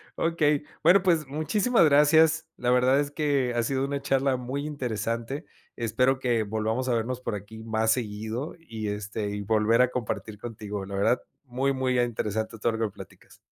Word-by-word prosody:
Okey. 150 -3 +1 0.2
Bueno, 190 +1 +6
pues 165 -6 +2
muchísimas 190 - +2
gracias. 155 +2 +5
La 125 0 0
verdad 125 +2 +4
es 145 0 -4
que 140 -4 0
ha 120 -1 +1
sido 135 +2 0
una 140 0 -2
charla 135 -1 +1
muy 130 +3 -4
interesante. 125 - -3 0.3
Espero 125 +3 +1
que 120 -4 +1
volvamos 110 +4 -2
a 125 - +2
vernos 120 +2 -1
por 125 - -3
aquí 105 +3 -9
más 110 0 +1
seguido, 110 +4 -3
y 115 -10 -6
este, 105 0 -3
y 105 0 -4
volver 110 +3 +3
a 125 0 +3
compartir 110 -3 -4
contigo. 105 -3 -6
La 100 0 -6
verdad 100 +5 +2 0.2
muy, 130 +2 0
muy 130 -1 0
interesante 110 -2 -2
todo 115 +2 +1
lo 110 -1 -1
que - - -32
platicas. - - -14
125 Hz, 180 wpm, -27 LUFS, 110-140 Hz, 0.3 s, Bueno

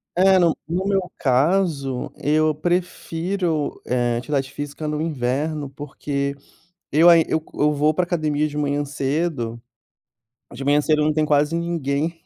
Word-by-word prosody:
É, 190 +1 +5
no 170 -2 +3
no 180 +4 -2
meu 195 -2 0
caso 140 -1 +1
eu 155 +1 +2
prefiro, 175 -1 -2
eh, 120 -1 0
atividade 135 +1 -2
física 145 +2 -5
no 150 0 -2
inverno, 145 0 -2
porque 140 0 -4 0.6
eu 160 +4 +5
aí 165 -2 +6
eu 160 - 0
eu 150 +1 +2
vou 150 +2 +2
pra 180 - +1
academia 155 -3 0
de 150 - -8
manhã 145 0 0
cedo, 140 -4 -2 0.9
de 125 +3 -7
manhã 145 +1 +4
cedo 150 0 +2
não 155 0 +2
tem 155 0 +1
quase 150 +2 +2
ninguém. 165 -1 -2
150 Hz, 145 wpm, -22 LUFS, 140-165 Hz, 0.9 s, aí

